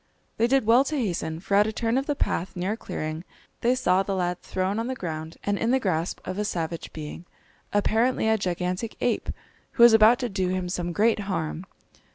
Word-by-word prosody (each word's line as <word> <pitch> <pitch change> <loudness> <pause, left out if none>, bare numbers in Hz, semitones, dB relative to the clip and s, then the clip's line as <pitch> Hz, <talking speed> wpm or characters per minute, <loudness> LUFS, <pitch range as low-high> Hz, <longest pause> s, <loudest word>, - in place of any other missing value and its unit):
They 230 - +3
did 270 -1 +2
well 235 +4 +6
to 305 - -2
hasten, 170 - -2
for 200 - -4
at 205 +1 +5
a - - -1
turn 230 +1 -1
of 270 +1 0
the 290 - 0
path 185 -8 -2
near 180 +3 -1
a - - -1
clearing 155 -5 -5 0.4
they 245 +2 +2
saw 185 -7 +2
the 195 0 -2
lad 180 -1 -1
thrown 190 +3 -2
on 230 - -2
the 260 - -2
ground 160 -5 -6
and 205 0 0
in 230 - 0
the 265 +2 +3
grasp 175 -6 -1
of 185 - -3
a - - +1
savage 170 -4 -3
being, 155 +2 -8 0.5
apparently 220 +3 +2
a 220 - +4
gigantic 180 +2 -2
ape, - - -1 0.4
who 235 - +5
was 235 -1 +9
about 220 +2 +7
to 250 -1 -2
do 190 -2 -1
him 185 -1 -2
some 175 -1 -2
great 215 +5 +2
harm. 185 -3 -3
200 Hz, 215 wpm, -26 LUFS, 175-230 Hz, 0.5 s, was